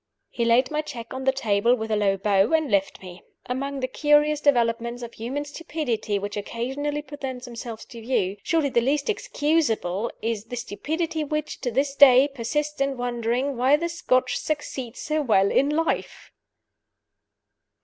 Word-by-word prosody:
He 235 - -1
laid 245 +3 +3
my 305 0 0
check 245 -7 -8
on 260 0 -5
the 265 - +5
table 235 -2 +2
with 220 -2 -5
a - - +3
low 200 -2 +2
bow, 195 - +2
and 315 -5 +2
left 195 -1 0
me. 180 -1 -10 0.2
Among 275 +2 -3
the 255 - 0
curious 295 +2 +3
developments 235 -3 +1
of 235 - -7
human 265 +6 -4
stupidity 290 -9 -3
which 205 +1 -4
occasionally 270 +8 -3
present 270 -4 -6
themselves 235 -2 -7
to 235 - -11
view, 205 -5 0
surely 320 +1 +1
the 235 - +2
least 280 - +1
excusable 255 - 0
is 225 -2 -3
the 245 - -6
stupidity 310 +8 -3
which, 305 +1 -3
to 245 - -1
this 275 +4 0
day, 270 -1 +7
persists 290 +3 -3
in 275 -1 0
wondering 245 +2 -1
why 260 +4 +5
the 340 +2 -2
Scotch 255 -7 +1
succeed 265 -5 -4
so 310 0 -1
well 200 -7 +3
in 275 - +3
life! 325 +2 -2
255 Hz, 165 wpm, -25 LUFS, 230-290 Hz, 0.2 s, day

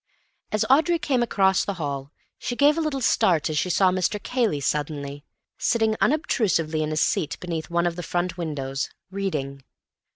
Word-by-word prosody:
As 215 - +1
Audrey 315 +6 +4
came 275 -6 0
across 195 -4 +3
the 200 - -3
hall 140 -4 -4 0.3
she 245 - -3
gave 290 +3 +5
a 330 - 0
little 300 -4 -2
start 170 -8 +2
as 155 - -2
she 165 - -1
saw 185 +1 +4
Mr. 185 +2 0
Cayley 230 - 0
suddenly, 145 0 -3 0.4
sitting 220 -2 +2
unobtrusively 195 - +1
in 155 0 -1
a 155 - -2
seat 160 0 +1
beneath 165 -3 -4
one 170 0 +1
of 170 -1 0
the 175 - -5
front 175 0 -2
windows, 140 -6 -3 0.2
reading. 150 -9 -3
175 Hz, 170 wpm, -24 LUFS, 150-220 Hz, 0.4 s, gave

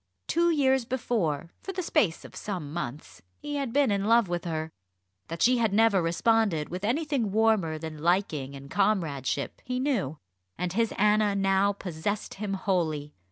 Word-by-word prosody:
Two 340 +1 +2
years 265 -5 +3
before, 215 - -1
for 385 - -6
the 370 0 -3
space 230 - +1
of - - -12
some 175 -8 -5
months, 135 - -6 0.2
he 290 0 -4
had 275 -4 -2
been 275 -2 +3
in 200 0 0
love 230 -1 +4
with 175 0 -3
her. 160 -1 -3 0.6
That 165 +1 -2
she 250 0 +4
had 225 -3 +2
never 215 -3 +4
responded 170 -1 +1
with 180 +3 -5
anything 265 -2 0
warmer 215 -7 +2
than 155 -1 -7
liking 160 -6 0
and 140 0 -11
comradeship 160 -10 0
he 250 0 -2
knew; 225 - -1 0.4
and 180 -1 -2
his 230 +2 +1
Anna 210 0 +3
now 195 0 +3
possessed 195 +2 -4
him 195 -1 -3
wholly. 160 -7 -1
195 Hz, 165 wpm, -28 LUFS, 160-230 Hz, 0.6 s, love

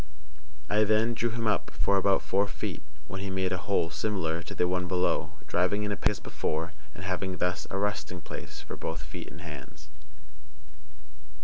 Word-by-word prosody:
I 105 +1 +4
then 110 +2 +4
drew 120 +1 +1
him 115 0 -2
up 105 - +2
for 100 - +4
about 95 0 +4
four 100 +1 +3
feet, - - -4 0.3
when 95 +3 -4
he 100 - -2
made 95 -1 +1
a 90 - +1
hole 85 -4 +3
similar 85 -4 0
to - - -7
the 90 - +3
one 90 0 +1
below, 90 0 +2
driving 95 +4 +2
in 105 - 0
a - - +1
peg - - +3
as 105 - -2
before, 80 +2 -2 0.2
and 85 - -7
having 95 0 -1
thus 90 0 0
a 95 - -1
resting 100 -3 -1
place - - -7
for - - -6
both 80 -2 -3
feet 75 - -6
and 85 - -10
hands. 75 -1 -9
95 Hz, 190 wpm, -30 LUFS, 85-100 Hz, 0.3 s, I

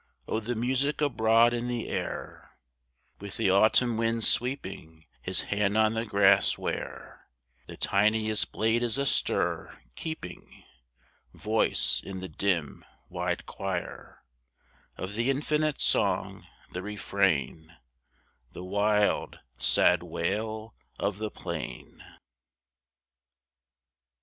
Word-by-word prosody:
O 110 - -1
the 120 +2 -3
music 130 +5 0
abroad 115 -4 +3
in 120 0 -2
the 120 -2 -3
air, - - -6 0.6
With 100 0 -8
the 95 - +2
autumn 110 +4 +4
wind 115 0 0
sweeping 80 - 0 0.2
His - - -1
hand 105 0 0
on 110 0 +3
the 115 +1 -2
grass, 100 -1 +4
where - - -6 0.4
The - - -9
tiniest 110 +1 +1
blade 110 +2 +1
is 120 -1 0
astir, 140 -1 0 0.2
keeping 160 - -8 0.7
Voice 110 +1 +2
in 95 -1 -7
the 95 - -6
dim, 85 -3 -2 0.3
wide - - -3
choir, 95 -3 -6 0.7
Of 95 +2 -5
the 115 +4 0
infinite 150 +2 0
song, - - +1 0.2
the 90 - -5
refrain, 95 -5 -1 0.8
The 90 - -8
wild, 105 +2 +1 0.2
sad - - +4
wail 110 +5 -3 0.2
of 100 0 -2
the 110 0 -3
plain - - -7
110 Hz, 105 wpm, -28 LUFS, 100-120 Hz, 0.8 s, autumn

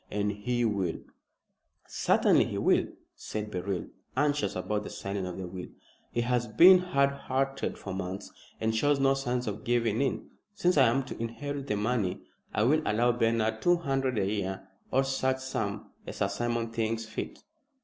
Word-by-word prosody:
And 105 0 0
he 120 +4 -1
will 100 -6 0 0.5
" - - -48
"Certainly - - +3
he - - -4
will," - - +3 0.3
said 105 0 -5
Beryl, 95 0 -2 0.3
anxious 145 +1 +1
about 105 +3 -1
the - - -6
signing 100 -1 -4
of 90 - -6
the 95 - -4
will. 90 0 -7 0.4
"He 120 - 0
has 120 0 0
been 180 - +8
hard 140 -7 +2
hearted 135 0 -2
for 95 - -6
months, 95 +1 -5 0.3
and 110 0 0
shows 145 +5 +3
no 135 0 +4
signs 125 -2 -1
of 105 0 -4
giving 115 -1 +1
in. 135 - -2 0.2
Since 180 -2 +2
I 135 -4 +6
am 135 +4 +2
to 130 - -8
inherit 140 +4 -4
the 105 - 0
money 105 -3 0 0.3
I 105 - +1
will 150 +7 +4
allow 120 +1 +2
Bernard 115 -2 +1
two 175 0 +4
hundred 135 -6 -1
a 100 - +2
year, 95 -1 -3 0.2
or 135 +1 +3
such 130 -1 0
sum 110 -6 -4 0.2
as - - -6
Sir 100 - +1
Simon 115 +2 -1
thinks 115 0 -1
fit." 110 - -6
115 Hz, 180 wpm, -29 LUFS, 105-135 Hz, 0.5 s, been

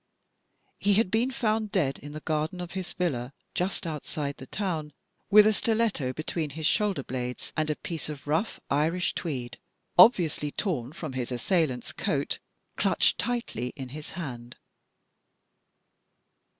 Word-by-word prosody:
He 200 0 +3
had 200 -3 +3
been 230 +3 +3
found 220 -4 0
dead 145 -9 +1
in 145 - -9
the 155 +1 -6
garden 155 +4 -1
of 175 -1 -5
his 185 -1 -4
villa 135 -8 -1 0.2
just 185 +1 -1
outside 150 -2 -3
the 130 - -10
town, 160 -6 -2 0.4
with 210 +1 +9
a 215 - +5
stiletto 215 - +1
between 155 +1 -2
his 155 +2 -4
shoulder 200 -5 +2
blades 125 -1 -4
and 155 0 +1
a 150 - +1
piece 160 -2 -5
of 145 -2 -7
rough 160 +9 0
Irish 160 +5 +2
tweed, 125 -7 -4 0.4
obviously 170 -8 +6
torn 140 - -1
from 155 -3 -6
his 130 -1 -3
assailant's 130 0 +1
coat, - - -1 0.4
clutched - - +3
tightly 230 - -2
in 135 -4 -6
his 150 +3 -7
hand. 120 -8 -6
155 Hz, 145 wpm, -28 LUFS, 135-190 Hz, 0.4 s, with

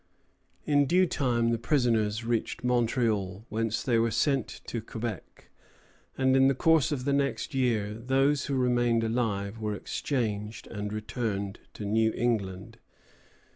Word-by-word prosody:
] - - -39
In 145 -1 +4
due 185 +4 +4
time 120 -7 +1
the 115 - 0
prisoners 115 -4 +1
reached 115 0 -2
Montreal, 115 -5 0
whence 110 0 -1
they 120 -3 +2
were 115 +1 +2
sent 135 +5 +1 0.2
to 115 - -4
Quebec; 110 -2 -7 0.7
and 130 0 +3
in 135 0 +6
the 135 - +2
course 160 +1 +3
of 130 -4 -2
the 140 - +1
next 140 +2 -1
year 115 -6 +1
those 135 +5 +1
who 140 - -1
remained 120 -2 +2
alive 110 -2 -1
were 105 -1 -2
exchanged 105 -4 -3
and 105 -1 -5
returned 105 -2 -3 0.2
to 105 - -6
New 110 +2 +2
England. 110 -2 -2
115 Hz, 145 wpm, -28 LUFS, 105-130 Hz, 0.7 s, in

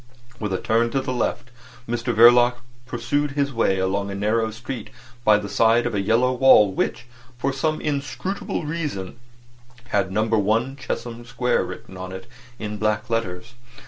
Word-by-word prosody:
With 105 -2 -3
a 95 - 0
turn 115 +1 +1
to 135 - +2
the 130 -1 -3
left 125 0 -2 0.4
Mr 120 +1 -1
Verloc 120 +2 +6 0.3
pursued 140 +4 -1
his 140 -1 0
way 115 -4 +2
along 100 +2 -1
a 100 - -4
narrow 110 +3 +1
street 115 +1 -7 0.3
by 110 -2 +6
the 105 -1 -5
side 115 +3 +3
of 120 - -1
a 100 - 0
yellow 115 +5 +2
wall 125 -6 +6
which, 115 +4 -2 0.3
for 140 +2 -1
some 155 +3 -1
inscrutable 150 +5 -3
reason, 150 - -4 0.7
had 100 -2 0
No. 110 +3 +1
1 110 +4 +1
Chesham 120 -3 -5
Square 125 +1 0
written 95 - -9
on 95 0 -6
it 95 +4 -8 0.3
in 105 -1 -5
black 110 +1 -1
letters. 95 -3 -3
115 Hz, 165 wpm, -23 LUFS, 105-130 Hz, 0.7 s, Verloc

